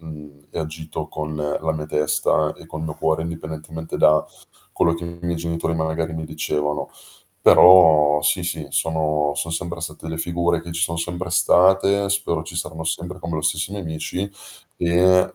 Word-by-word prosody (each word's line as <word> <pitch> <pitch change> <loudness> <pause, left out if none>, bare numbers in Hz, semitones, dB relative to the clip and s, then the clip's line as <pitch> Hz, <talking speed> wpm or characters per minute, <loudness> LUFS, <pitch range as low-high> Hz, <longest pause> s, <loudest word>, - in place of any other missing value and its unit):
Mhmm, 75 -3 -12
e - - -6
ho - - 0
agito 80 +1 -6
con 75 0 -5
la 75 +1 -1
mia 75 -1 -5
testa 75 0 +1
e - - -15
col 80 0 -7
mio 80 -2 -4
cuore, 80 +1 0
indipendentemente 80 -1 -6
da 75 0 +4 0.5
quello 85 - +2
che 85 - -6
i 85 0 -8
miei 85 0 -1
genitori, 85 0 -2
magari, 80 0 -2
mi 80 0 -4
dicevano. 75 -2 -2 0.5
Però, 80 -5 +7
sì, - - +2
sì, - - -3
sono 75 -2 0
son 85 - -3
sempre 85 0 -4
state 80 -1 -7
delle 80 0 -4
figure 85 0 0
che 85 +1 -10
ci 85 0 -2
son 85 0 0
sempre 85 +2 -4
state, 95 +3 +4
spero 95 -5 0
ci 85 +1 -9
saranno 80 -1 -4
sempre, 90 +3 -3
come 85 -2 -4
lo - - -2
stesso 80 +4 0
i - - -6
mie 100 - -5
amici, 85 +4 -4 0.5
e 90 +2 +3
80 Hz, 185 wpm, -22 LUFS, 80-85 Hz, 0.5 s, Però